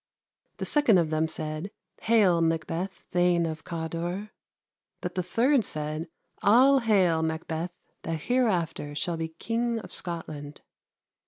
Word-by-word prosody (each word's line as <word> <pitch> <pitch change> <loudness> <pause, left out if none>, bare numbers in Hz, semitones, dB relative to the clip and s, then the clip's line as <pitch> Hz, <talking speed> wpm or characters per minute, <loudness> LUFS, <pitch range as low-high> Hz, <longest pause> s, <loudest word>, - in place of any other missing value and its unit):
The - - -3
second 290 -10 +4
of 165 -3 +1
them 155 +1 +1
said; 155 +4 -4 0.3
'Haile, 205 -7 +4
Makbeth, 165 +3 0 0.2
thane 175 -1 +3
of 160 -1 -4
Cawder.' 170 +4 -4 0.7
But 180 - -4
the 185 - 0
third 235 +8 +2
said; 155 0 -3 0.3
'All 260 +6 +6
haile, 190 -8 +3
Makbeth, 160 +1 -2 0.3
that 165 -2 -3
heereafter 175 - 0
shall 170 +2 -2
be 165 0 -2
King 235 +2 -1
of 225 - -8
Scotland.' 155 -4 -5
170 Hz, 130 wpm, -27 LUFS, 160-215 Hz, 0.7 s, All